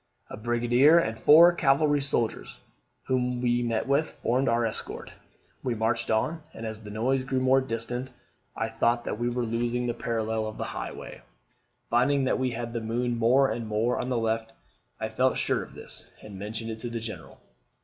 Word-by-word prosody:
A - - -5
brigadier 120 +7 +4
and 115 -10 +1
four 160 +9 +8
cavalry 145 -2 +3
soldiers, 120 -5 -2 0.5
whom 125 -1 0
we 120 0 +1
met 115 0 -1
with, 140 +3 +2
formed 130 +3 +2
our 115 0 +2
escort. 110 - -5 0.5
We 125 -2 -1
marched 115 +1 0
on; 150 +9 0
and, 115 - -6
as 110 -1 -5
the 105 - -10
noise 130 +5 0
grew 130 0 -1
more 130 +1 +4
distant, 120 +1 -4 0.4
I 115 - -1
thought 115 +1 +1
that 110 - -4
we 120 0 0
were 120 0 -1
losing 120 +2 -1
the 120 - 0
parallel 110 -1 -2
of 110 - -7
the - - -3
highway. - - -6 0.7
Finding 135 +4 +3
that 130 - +1
we 130 -1 +1
had 120 0 -5
the 115 - -2
moon 120 +1 -1
more 130 +4 +4
and 115 -1 -4
more 110 +3 0
on 125 - -4
the 125 - 0
left, 115 0 -1 0.5
I - - -2
felt - - +1
sure - - 0
of - - -11
this, - - -6
and 100 -3 -9
mentioned 110 +3 -5
it 110 - -7
to 120 - -4
the 115 0 -4
General. 110 0 -8
120 Hz, 190 wpm, -27 LUFS, 115-130 Hz, 0.7 s, four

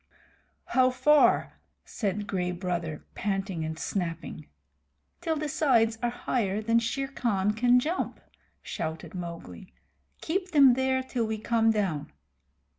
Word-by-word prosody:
"How 255 0 +3
far?" 270 +4 +3 0.3
said 205 -1 -2
Gray 180 -4 -1
Brother, 175 -4 -4
panting 195 -4 -2
and 160 0 -4
snapping. 165 -4 -4 0.7
"Till 325 -2 0
the 305 0 -2
sides 230 -7 +2
are 240 - +1
higher 220 -4 -1
than 230 +2 +2
Shere 270 +4 -2
Khan 210 -7 0
can 245 +3 +4
jump," 320 +8 -2 0.4
shouted 160 0 -5
Mowgli. 175 +1 -8 0.5
"Keep 365 +2 -2
them 275 -4 +7
there 260 +1 +1
till 245 -3 -2
we 220 0 -2
come 225 +1 +2
down." 195 - -1
225 Hz, 125 wpm, -28 LUFS, 185-260 Hz, 0.7 s, them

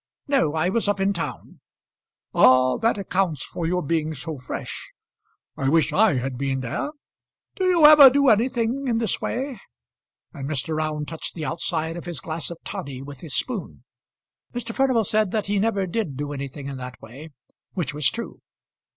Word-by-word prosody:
"No; 265 - +2
I 160 +3 +1
was 220 +2 0
up 205 -1 +1
in 195 +1 +2
town." 170 - -6 0.7
"Ah! 130 0 +5
that 225 -1 +1
accounts 185 -6 -1
for 165 - -4
your 180 +1 0
being 155 +1 -1
so 150 +1 -6
fresh. 125 - -6 0.6
I 135 - 0
wish 160 +2 +3
I 215 -6 +4
had 125 0 -3
been 135 -1 -1
there. 125 - -3 0.7
Do 375 - -1
you 350 -4 +5
ever 300 -3 +11
do 280 +2 +2
anything 240 +3 +2
in 235 -2 +1
this 225 -4 0
way?" 255 -3 -3 0.7
and 135 0 -6
Mr. 155 +1 -1
Round 155 -1 -2
touched 165 -1 -5
the 160 -3 -4
outside 160 +3 -2
of 175 - -8
his 175 -4 -4
glass 160 0 -5
of 170 - -7
toddy 140 -10 -6
with 140 -1 -10
his 155 -6 -6
spoon. 235 -7 -3 0.7
Mr. 230 -1 -4
Furnival 260 -4 +2
said 215 0 +1
that 215 +1 -1
he 200 0 0
never 200 -2 +1
did 175 - -3
do 145 0 -4
anything 140 0 -6
in 140 -1 -5
that 125 0 -8
way, 135 +8 -11 0.4
which 160 -8 -2
was 150 -2 +3
true. 235 - -7
170 Hz, 180 wpm, -24 LUFS, 145-225 Hz, 0.7 s, ever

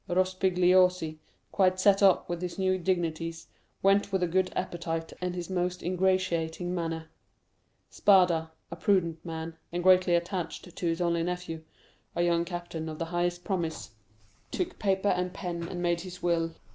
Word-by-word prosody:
Rospigliosi, 180 -2 +3 0.3
quite 185 -1 +2
set 195 +1 +4
up 195 -2 +5
with 175 0 -4
his 180 -1 -4
new 185 -1 +1
dignities, 165 -2 -2 0.4
went 200 +1 +3
with 190 -2 +1
a - - +2
good 185 +2 +1
appetite 165 -2 -3
and 180 0 -2
his 175 -1 -4
most 180 -1 -2
ingratiating 180 -2 0
manner. 165 -2 -3 0.8
Spada, 180 -5 +4 0.2
a - - -4
prudent 170 -3 +1
man, 160 -1 -6
and 175 +1 -2
greatly 185 -1 +5
attached 175 0 -3
to - - -4
his 165 +1 0
only 170 -1 +1
nephew, 175 -2 -3 0.5
a 170 - +1
young 170 -1 +2
captain 175 -2 -5
of 155 - -6
the 165 - -2
highest 175 0 0
promise, 170 - -3 0.6
took 360 0 -3
paper 195 0 +1
and 180 +1 -1
pen, 170 -3 -4
and 175 0 -5
made 170 -1 +1
his 180 0 -9
will. 165 -1 +1
175 Hz, 160 wpm, -29 LUFS, 170-185 Hz, 0.8 s, up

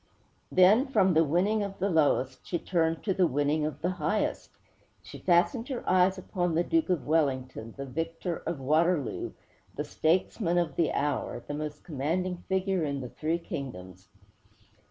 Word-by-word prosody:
Then, 205 +9 +5
from 190 -9 +3
the 160 +1 +5
winning 185 +8 +1
of 200 -1 -4
the 195 - 0
lowest, 145 -7 +1
she 175 - -1
turned 165 -1 0
to 195 - +1
the 185 -2 +3
winning 145 +2 +1
of 150 0 -7
the 180 - +1
highest. 205 +3 -1 0.5
She - - -10
fastened 185 +8 +2
her 260 -4 -5
eyes 185 +1 +4
upon 180 -2 -2
the 170 - +3
Duke 325 - +1
of 180 -5 0
Wellington, 130 -7 -1
the 140 - -5
victor 165 +5 -3
of 170 - -2
Waterloo, 155 +1 +1 0.4
the - - -2
statesman 175 +2 0
of 165 -5 0
the 165 - +2
hour, 140 -4 -2
the - - -4
most 150 0 -5
commanding 170 +5 -2
figure 190 -2 +1
in 140 -2 -2
the 125 - -6
three 160 +6 -1
kingdoms. 95 - -7
165 Hz, 165 wpm, -29 LUFS, 145-185 Hz, 0.5 s, Then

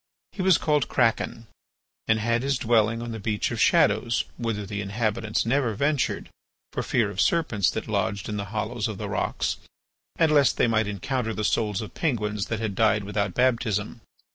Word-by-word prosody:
He 195 - -5
was 185 -1 +5
called 150 -3 +1
Kraken, 115 -1 0 0.6
and 110 - +3
had 115 +2 +1
his 135 0 0
dwelling 115 -1 +2
on 120 - -5
the 110 - -5
Beach 105 0 -1
of - - -2
Shadows 115 0 +3
whither 115 -4 -3
the 100 +1 -4
inhabitants 105 +1 -1
never 120 -2 +1
ventured 140 +3 0 0.5
for - - -1
fear 110 -4 +1
of 95 - -1
serpents 120 - +2
that - - -4
lodged 100 -1 -1
in 105 - -3
the 100 -1 -3
hollows 110 +3 -2
of 110 -3 -5
the - - -4
rocks - - -1 0.6
and 165 -2 +3
lest 145 -3 +4
they - - +4
might 110 -2 +1
encounter 110 +3 -2
the 105 - -2
souls 105 -1 0
of 110 - -8
Penguins 105 - -1
that 110 - -2
had 110 -3 -2
died 110 0 +2
without 100 -2 -2
baptism. 115 -3 0
110 Hz, 185 wpm, -25 LUFS, 105-120 Hz, 0.6 s, was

